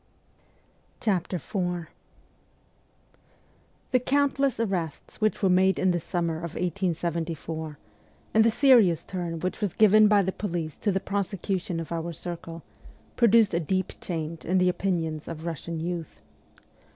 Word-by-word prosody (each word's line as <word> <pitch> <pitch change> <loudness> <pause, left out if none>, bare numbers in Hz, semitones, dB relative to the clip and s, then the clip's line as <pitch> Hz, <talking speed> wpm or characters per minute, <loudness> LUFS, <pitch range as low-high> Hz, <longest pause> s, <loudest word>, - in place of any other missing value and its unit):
IV 190 -5 +1 2.6
THE 255 - +4
countless 275 -2 +1
arrests 185 -6 -3
which 215 0 +1
were 190 - +4
made 190 +1 +4
in 185 - +2
the 175 - 0
summer 170 -1 -2
of 170 0 -6
1874, 165 -3 -2 0.6
and 220 - +6
the 230 - +5
serious 225 - +5
turn 175 -3 -4
which 185 +4 -3
was 205 -5 -1
given 215 0 +6
by 205 -1 +4
the 190 - -1
police 170 -7 -4
to 205 - 0
the 190 - +1
prosecution 195 -3 -2
of 165 - -6
our 170 0 -3
circle, 165 -1 -7 0.5
produced 230 -3 +5
a 170 - +2
deep 185 +3 -1
change 165 -2 -4
in 185 +3 +1
the 180 0 +4
opinions 165 -5 -2
of 165 -1 -6
Russian 165 0 -4
youth. 170 -1 -4
180 Hz, 135 wpm, -27 LUFS, 165-200 Hz, 2.6 s, and